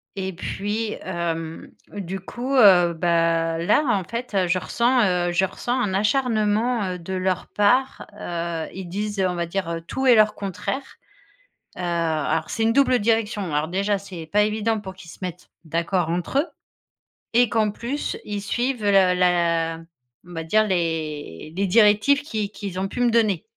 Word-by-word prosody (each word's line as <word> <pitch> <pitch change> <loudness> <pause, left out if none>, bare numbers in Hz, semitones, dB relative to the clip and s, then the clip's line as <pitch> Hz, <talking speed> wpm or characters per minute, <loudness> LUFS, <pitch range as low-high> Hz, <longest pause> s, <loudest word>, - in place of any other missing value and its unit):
Et 190 -1 -3
puis, 210 +5 -3
hem, 165 -3 -4 0.2
du 195 -1 -5
coup, 245 +8 -5
heu, 185 -8 +6
bah, 165 -1 +1
là, 170 - +3
en 190 - -3
fait, 235 +2 -6
heu, 185 -2 +2
je 185 +1 +1
ressens, 240 +9 +2
heu, 180 -2 +1
je 175 +2 +2
ressens 240 +5 -3
un 190 -4 -1
acharnement, 220 0 +1
heu, 180 -1 -4
de 175 +3 -6
leur 185 -1 -1
part. 250 +6 +1
Heu, 170 -4 -4
ils 190 0 -6
disent, 205 +3 -3
on 180 - -2
va 170 -1 -2
dire, 185 0 -3
heu, 165 0 -3
tout 265 +10 -4
et 255 - +7
leur 215 -1 +4
contraire. 205 +7 -5 0.8
Heu, - - -5
alors 165 -3 -1
c'est 225 - -1
une 225 0 +2
double 260 -2 +4
direction. 210 -5 0
Alors, 150 +1 0
déjà, 200 +3 0
c'est 190 -5 -8
pas 210 0 +4
évident 220 +1 0
pour 190 -2 -7
qu'ils 180 -3 -13
se - - -13
mettent 180 -1 -6 0.2
d'accord 170 +1 -1
entre 175 +10 -1
eux 315 - -2 0.9
et 240 0 +4
qu'en 215 -1 +1
plus, 245 +7 -4
ils 205 -1 -4
suivent 240 +3 -2
le 205 - +4
la 175 -3 +3 0.5
on 175 - -14
va 165 -1 -4
dire, 215 +7 +3
les 155 - -3
les 200 - +1
directives 210 +7 +4
qu'ils 215 -8 -3
qu'ils 195 -4 -6
ont 195 - -1
pu 245 - -4
me 240 - +4
donner. 215 -6 +2
195 Hz, 180 wpm, -23 LUFS, 170-215 Hz, 0.9 s, et